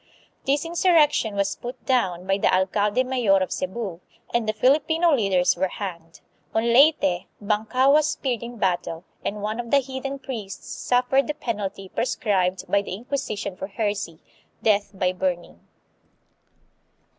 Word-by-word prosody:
This 285 +3 +2
insurrection 330 - +3
was 200 0 0
put 245 +1 -8
down 185 -9 +1
by 195 +1 +1
the - - +3
alcalde 205 +5 +2
mayor 250 -6 +2
of 185 -1 -1
Cebu 185 -2 -4 0.3
and 235 -2 +1
the - - +4
Filipino 315 +8 +3
leaders 195 -8 +3
were 190 - +1
hanged. 170 -4 -7 0.3
On 230 +1 +2
Leyte, 245 - +4
Bankao 220 +6 +2
was 305 0 +4
speared 260 -6 -2
in 240 0 -7
battle, 175 -4 -1 0.2
and 205 0 -3
one 215 +2 -2
of 235 -1 -4
the 280 - +5
heathen 270 +1 -3
priests 230 -8 -7
suffered 250 +2 +1
the 300 - -2
penalty 205 -8 -4
prescribed 190 -4 0
by 200 - +2
the 200 - -5
Inquisition 215 -4 -4
for 190 - -6
heresy 205 -5 -3 0.5
death 205 -2 +3
by 185 -2 0
burning. 180 - -3
215 Hz, 145 wpm, -24 LUFS, 190-260 Hz, 0.5 s, the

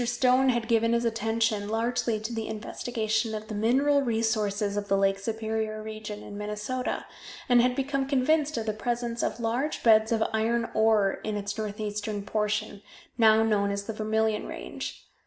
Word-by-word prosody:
Stone 250 +2 +3
had 240 -2 0
given 230 0 +3
his 235 0 +1
attention 225 -2 0
largely 230 0 0
to 220 +3 -5
the 225 -1 -3
investigation 220 0 -2
of 215 0 -6
the - - -4
mineral 265 +7 +3
resources 220 -4 0
of 205 0 -2
the 195 - +2
Lake 195 0 +2
Superior 220 0 -2
region 215 -1 -7
in 205 0 -8
Minnesota, 210 +5 -3 0.4
and 245 -1 +6
had 250 +1 +2
become 275 0 -1
convinced 295 +3 +2
of 225 - -2
the 215 - -1
presence 235 +1 -2
of - - -2
large 240 +6 -1
beds 220 -1 +5
of 225 -1 +2
iron 230 +1 0
ore 220 -3 +3
in 215 -1 -2
its 205 0 -4
northeastern 210 -1 -3
portion, 210 -1 -2 0.4
now 220 -1 +6
known 205 -2 +2
as 200 0 -2
the 225 - -5
Vermillion 220 0 0
Range. - - -6
220 Hz, 170 wpm, -27 LUFS, 210-235 Hz, 0.4 s, and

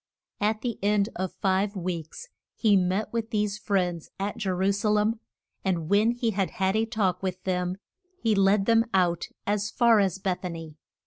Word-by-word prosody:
At 215 +1 0
the 235 -2 -3
end 205 +1 +2
of 185 0 -2
five 195 +2 0
weeks 180 - -5 0.3
he 215 -3 +3
met 190 +4 0
with 230 -1 -2
these 210 -2 -1
friends 180 -6 -1
at 200 +1 -2
Je 210 -4 -2
ru 190 +2 +2
sa 205 +2 0
lem. 210 +2 +2 0.4
And 170 -4 -1
when 210 +3 +4
he 240 -1 0
had 195 -2 0
had 190 -3 0
a 220 +1 +1
talk 195 -6 0
with 185 -1 -4
them 180 0 -1 0.4
he 225 -2 +2
led 195 0 +3
them 230 0 +4
out 175 -2 +2 0.2
as 205 0 0
far 235 -3 +4
as 195 -3 +1
Beth 190 -1 -2
a 180 - -2
ny. 165 -2 -7
200 Hz, 190 wpm, -27 LUFS, 185-215 Hz, 0.4 s, when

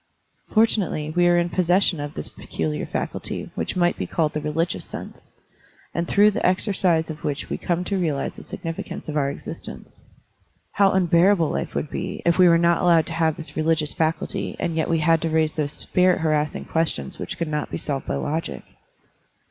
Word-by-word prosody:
Fortunately, 195 -9 +1
we 175 0 +4
are 175 0 +4
in 175 0 +1
possession 180 0 +2
of 145 0 -5
this 75 - -4
peculiar 80 -2 -4
faculty - - -4
which - - -3
might 175 -1 +2
be - - -2
called 155 -3 0
the 150 - -2
religious 160 +3 -1
sense, - - -10 0.6
and 170 0 -1
through 205 +1 +5
the 215 - -3
exercise 185 -4 +2
of 155 - -10
which 145 -1 -3
we - - -1
come 175 0 -1
to 195 +1 -1
realize 155 -6 -1
the - - -10
significance 165 0 -6
of 155 - -4
our 140 -2 +2
existence. - - -8 0.7
How 195 -1 +4
unbearable 175 -1 +4
life - - -3
would 150 - -2
be, - - -4
if 170 +2 +3
we 180 -1 +8
were 170 - +6
not 170 0 +3
allowed 170 -2 +4
to 165 - -6
have 160 -1 +1
this 165 - -7
religious 155 -1 +1
faculty 160 0 -1
and 165 - -1
yet 160 - 0
we 165 - +3
had 165 0 +3
to 165 - 0
raise 155 -1 +2
those 150 -2 -2
spirit 180 -1 +2
harassing 155 -2 0
questions 160 - -2
which - - -5
could 170 - -2
not 150 -1 -2
be - - -3
solved 140 -3 -3
by - - -1
logic! 150 - -3
165 Hz, 195 wpm, -23 LUFS, 155-175 Hz, 0.7 s, we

